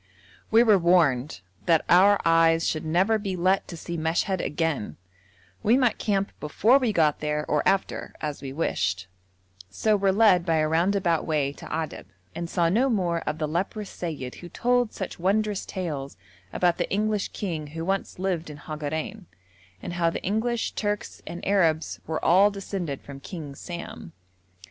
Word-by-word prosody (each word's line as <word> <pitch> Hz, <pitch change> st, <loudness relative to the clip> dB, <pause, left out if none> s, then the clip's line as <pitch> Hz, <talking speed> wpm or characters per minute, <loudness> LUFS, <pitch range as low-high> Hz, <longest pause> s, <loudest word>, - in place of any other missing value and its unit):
We 225 Hz, +2 st, +6 dB
were 215 Hz, -4 st, +5 dB
warned 155 Hz, -, +2 dB, 0.3 s
'that 165 Hz, -2 st, +4 dB
our 195 Hz, +3 st, +6 dB
eyes 165 Hz, 0 st, +4 dB
should 155 Hz, -, -1 dB
never 190 Hz, +7 st, +2 dB
be 195 Hz, -3 st, -3 dB
let 185 Hz, +2 st, +1 dB
to 170 Hz, -, -8 dB
see 170 Hz, +1 st, -5 dB
Meshed 165 Hz, +3 st, 0 dB
again;' 150 Hz, -, -2 dB, 0.6 s
we 230 Hz, +4 st, +4 dB
might 250 Hz, -3 st, +2 dB
camp 200 Hz, -2 st, 0 dB
before 220 Hz, -, +3 dB
we 250 Hz, -4 st, +1 dB
got 155 Hz, -6 st, +2 dB
there, 150 Hz, 0 st, -1 dB
or 150 Hz, -, +2 dB
after, 195 Hz, 0 st, 0 dB
as 150 Hz, -2 st, -4 dB
we 135 Hz, -2 st, -6 dB
wished, 95 Hz, -, -1 dB, 0.6 s
so 215 Hz, -, +1 dB
were 195 Hz, -1 st, +2 dB
led 195 Hz, -3 st, +5 dB
by 165 Hz, -2 st, +1 dB
a 155 Hz, -1 st, +2 dB
roundabout 170 Hz, +1 st, +1 dB
way 145 Hz, -3 st, 0 dB
to -, -, -11 dB
Adab, 160 Hz, -1 st, -4 dB, 0.3 s
and 170 Hz, 0 st, -5 dB
saw 170 Hz, -1 st, +2 dB
no 235 Hz, +10 st, +2 dB
more 180 Hz, -7 st, +1 dB
of 155 Hz, -, -1 dB
the 155 Hz, -1 st, -1 dB
leprous 190 Hz, +6 st, -3 dB
seyyid 150 Hz, -7 st, -5 dB
who 175 Hz, -, -9 dB
told 245 Hz, +1 st, +1 dB
such 190 Hz, -, -6 dB
wondrous 205 Hz, +2 st, 0 dB
tales 145 Hz, -, -5 dB, 0.3 s
about 175 Hz, -1 st, +1 dB
the -, -, -1 dB
English 210 Hz, 0 st, 0 dB
king 165 Hz, -7 st, -4 dB
who 165 Hz, +2 st, -6 dB
once 195 Hz, +1 st, -2 dB
lived 180 Hz, -3 st, -2 dB
in 150 Hz, -, -8 dB
Hagarein, 155 Hz, +6 st, -5 dB, 0.6 s
and -, -, -5 dB
how 170 Hz, -1 st, +2 dB
the -, -, -5 dB
English, 225 Hz, +4 st, -1 dB
Turks, 205 Hz, -1 st, -3 dB
and 175 Hz, -, -6 dB
Arabs 165 Hz, -5 st, +2 dB
were 160 Hz, 0 st, -3 dB
all 190 Hz, +5 st, +6 dB
descended 195 Hz, -7 st, -5 dB
from 140 Hz, -1 st, -9 dB
King 150 Hz, -1 st, -7 dB
Sam. 175 Hz, +4 st, -8 dB
175 Hz, 170 wpm, -26 LUFS, 155-200 Hz, 0.6 s, We